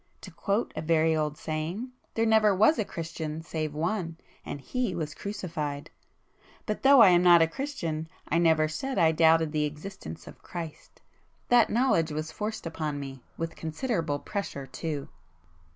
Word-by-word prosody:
To 185 - -10
quote 200 +7 -1
a - - -3
very 160 0 +3
old 150 -1 -1
saying 165 +11 -4 0.2
'There 225 - +2
never 220 -2 +4
was 220 - +4
a - - +2
Christian 160 -2 -5
save 155 -2 -3
One, 165 +1 -2 0.3
and 145 - -6
He 250 - -2
was 155 -2 -3
crucified.' 155 -7 -5 0.7
But 215 - -3
though 270 -2 +7
I 200 - +8
am 175 -1 +5
not 175 -2 +7
a - - +2
Christian 165 - -4 0.2
I 165 - +2
never 160 -2 +4
said 260 +13 -4
I 160 -1 +5
doubted 160 0 +4
the 150 -1 +1
existence 150 - -7
of - - -13
Christ. 165 -3 -8 0.5
That 240 -2 +5
knowledge 220 -10 +2
was 155 +1 -4
forced 215 +4 -4
upon 155 -3 -3
me,—with 140 +4 -7
considerable 160 - -2
pressure 145 -5 -5
too!" 140 +2 -4
165 Hz, 160 wpm, -28 LUFS, 155-200 Hz, 0.7 s, I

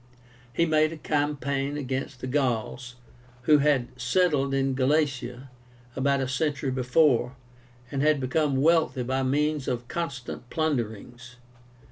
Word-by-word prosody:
He 170 +7 +2
made 155 -1 +3
a 165 - -7
campaign 145 -1 -1
against 130 -2 -4
the - - -4
Gauls, 125 -2 -1 0.5
who 150 +3 +5
had 140 -4 +2
settled 140 0 +2
in 135 0 +1
Galatia 135 -2 0 0.4
about 140 +1 +1
a 130 - -1
century 140 +1 -1
before, 125 0 +2 0.6
and 135 -1 -1
had 150 0 +3
become 135 +1 0
wealthy 160 -5 +3
by 130 +2 -1
means 145 +2 0
of 120 -1 -3
constant 135 -7 -5
plunderings. 120 -4 -3
135 Hz, 125 wpm, -26 LUFS, 125-150 Hz, 0.6 s, who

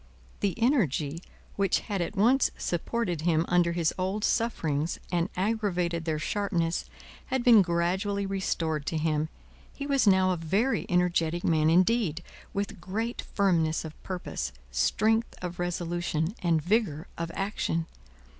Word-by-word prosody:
The 200 -3 0
energy 170 - +1 0.4
which 195 -2 +2
had 200 -4 -3
at 175 - -3
once 240 +7 +4
supported 175 -1 -2
him 165 0 +2
under 175 -1 +3
his 170 -2 +1
old 190 +3 -1
sufferings 165 -11 0
and 175 +1 +1
aggravated 180 -5 0
their 160 -2 0
sharpness, 170 -1 -1 0.4
had 260 -1 -1
been 235 -4 +8
gradually 190 +3 0
restored 165 -6 -1
to 160 - -1
him. 155 0 0 0.4
He 280 - -6
was 275 -5 +2
now 190 -1 +5
a 180 - 0
very 195 +11 0
energetic 175 -1 +1
man 155 -2 +3
indeed, 180 -1 +2 0.3
with 200 -3 -4
great 220 +7 -3
firmness 165 -6 +1
of 155 - -10
purpose, 175 - -4 0.2
strength 215 - +1
of 180 -1 -6
resolution, 175 -1 -1
and 165 -3 +2
vigour 180 -5 +1
of 170 0 -4
action. 195 -4 -1
175 Hz, 135 wpm, -28 LUFS, 165-205 Hz, 0.4 s, been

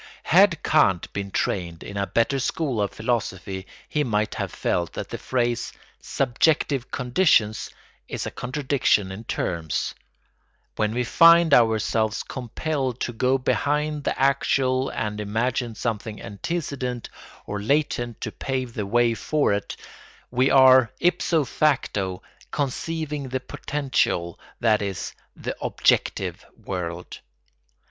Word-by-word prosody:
Had 180 -1 +4
Kant 95 - +2
been 100 -1 -3
trained 85 -3 -2
in 100 - -8
a 100 0 -1
better 115 +4 +1
school 130 -3 -1
of 100 - +1
philosophy 100 -5 -3 0.2
he 150 - 0
might 105 -4 0
have - - -3
felt 85 -1 -1
that - - -5
the - - -5
phrase 120 -2 -1 0.3
"subjective 135 0 +1
conditions" 125 - +2 0.4
is - - -4
a - - -4
contradiction 130 -7 0
in 105 +4 -8
terms. 85 -7 -2 0.8
When 110 +1 0
we 125 - +1
find 165 +4 +6
ourselves 110 -2 +3
compelled 130 0 -3
to 120 - -2
go 130 +3 +2
behind 150 +3 0
the - - -2
actual 135 -1 +2
and 105 -1 -3
imagine 115 +3 -1
something 110 -1 -3
antecedent 125 - -4 0.4
or 105 0 -4
latent 120 -2 0
to 110 - -3
pave 130 -1 -3
the 105 -3 -3
way 120 +2 +3
for 145 +2 +1
it, 100 - -3 0.6
we 130 +2 +3
are 130 -3 +7
ipso 170 -2 +2
facto 105 -10 0 0.3
conceiving 150 0 -3
the 130 +1 -1
potential, 130 - -1 0.2
that 110 -2 +3
is, 100 -3 -4 0.2
the - - -5
"objective" - - +1
world. 90 -2 -5
120 Hz, 125 wpm, -24 LUFS, 105-140 Hz, 0.8 s, are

